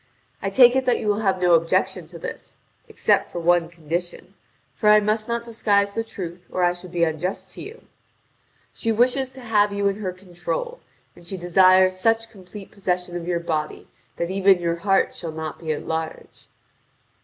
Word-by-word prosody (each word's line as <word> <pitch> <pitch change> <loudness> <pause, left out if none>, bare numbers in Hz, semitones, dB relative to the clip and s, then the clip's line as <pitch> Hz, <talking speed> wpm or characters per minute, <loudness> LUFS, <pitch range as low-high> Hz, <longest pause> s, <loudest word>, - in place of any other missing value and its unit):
I 195 - -1
take 245 +4 +6
it 265 -1 0
that 245 - +3
you - - -4
will 205 0 +1
have 195 -3 +1
no 180 -1 +3
objection 165 0 +1
to - - -11
this, - - -8 0.3
except - - +1
for - - -7
one 170 0 +2
condition 170 +1 -5 0.4
(for 210 - +1
I 210 0 +8
must 215 +1 -1
not 235 0 -2
disguise 205 -3 +1
the 225 - -2
truth, 180 -5 -8
or 180 - -1
I 175 0 +3
should 180 0 -12
be 175 -1 0
unjust 180 +4 -2
to - - -9
you): 445 +4 -10 0.9
she 225 - -1
wishes 255 +4 +2
to 260 - -11
have 210 -3 +2
you 200 0 0
in 200 0 -1
her 195 -3 -3
control, 190 - -5 0.4
and - - -16
she 190 +3 -5
desires 185 +1 +4
such 225 +2 +1
complete 195 -1 -12
possession 180 -3 -3
of 175 -1 -5
your 175 -1 0
body 155 -3 -3 0.3
that 170 +1 -3
even 195 0 +4
your 170 -1 -1
heart 195 +2 +1
shall 165 -2 -6
not 160 0 -6
be 160 -2 -3
at 150 - -4
large." 160 0 -5
185 Hz, 190 wpm, -23 LUFS, 175-215 Hz, 0.9 s, I